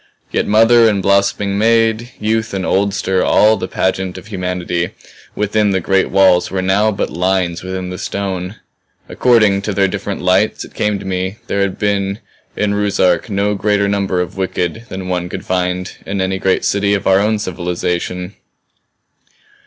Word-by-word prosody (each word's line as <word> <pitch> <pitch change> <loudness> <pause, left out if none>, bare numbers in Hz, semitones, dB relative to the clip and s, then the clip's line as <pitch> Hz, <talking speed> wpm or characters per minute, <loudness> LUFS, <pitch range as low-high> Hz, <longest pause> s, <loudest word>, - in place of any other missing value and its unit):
Yet - - 0
mother 115 +2 +5
and 100 -2 0
blossoming 100 0 +1
maid, 115 +1 +2
youth 110 -1 -1
and 95 -1 -2
oldster, 95 -1 +1
all 110 +1 +4
the 95 -3 -4
pageant 95 -1 -1
of 95 - -10
humanity 90 -3 -3 0.4
within 105 0 +1
the 95 - +1
great 95 +2 +1
walls 95 -2 +4
were 95 -1 -2
now 100 +3 +2
but 100 - -3
lines 90 0 0
within 95 0 -5
the 90 - -6
stone. 95 -1 -4 0.5
According 110 -5 +3
to 105 +1 -3
their 100 0 +3
different 100 0 -4
lights, 95 +4 +2
it - - -16
came 105 -1 0
to - - -9
me, 95 +2 -3
there 100 - -1
had 100 -1 -1
been 100 -1 0 0.4
in 105 -1 0
Ruszark 100 0 +1
no 100 0 0
greater 100 0 +1
number 100 -2 0
of 90 - -4
the - - -10
wicked 95 +4 -2
than 95 -1 -6
one 90 -1 -2
could - - -6
find 90 0 -1
in 100 0 -4
any 95 0 -1
great 95 -1 +1
city 100 0 +1
of 100 - -4
our 95 0 +4
own 105 +2 +1
civilization. 90 0 -3
95 Hz, 170 wpm, -16 LUFS, 95-105 Hz, 0.5 s, mother